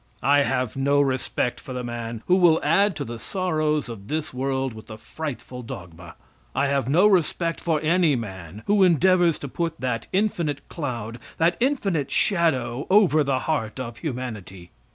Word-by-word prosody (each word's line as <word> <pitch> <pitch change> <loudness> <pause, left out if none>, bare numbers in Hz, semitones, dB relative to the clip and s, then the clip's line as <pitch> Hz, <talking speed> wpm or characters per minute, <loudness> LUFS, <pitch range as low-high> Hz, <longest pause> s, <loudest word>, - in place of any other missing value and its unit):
I 145 +1 +5
have 130 -4 0
no 140 +1 +2
respect 130 -3 0
for 130 - -8
the 125 0 -4
man 115 -1 -5
who 180 - +4
will 170 -3 +5
add 190 +5 +3
to 145 - -4
the 115 -1 -7
sorrows 155 - -1
of 105 -4 -9
this 155 +1 -3
world 130 0 -1
with 110 0 -12
the 110 - -9
frightful 130 -1 -7
dogma. 85 -6 -10 0.4
I - - +2
have 135 -3 0
no 175 +8 +5
respect 170 -3 +2
for 160 -3 +1
any 165 -1 +3
man 95 -3 -7
who 205 0 +3
endeavors 175 -1 +4
to 140 - -6
put 165 +3 -3
that 125 -3 -2
infinite 170 -8 -1
cloud, 120 -7 -5 0.2
that 165 +1 +3
infinite 205 - 0
shadow, 140 - +1
over 185 -6 +5
the 135 -2 0
heart 130 -7 -2
of 120 -3 -6
humanity. 110 - -6
140 Hz, 170 wpm, -24 LUFS, 120-165 Hz, 0.4 s, I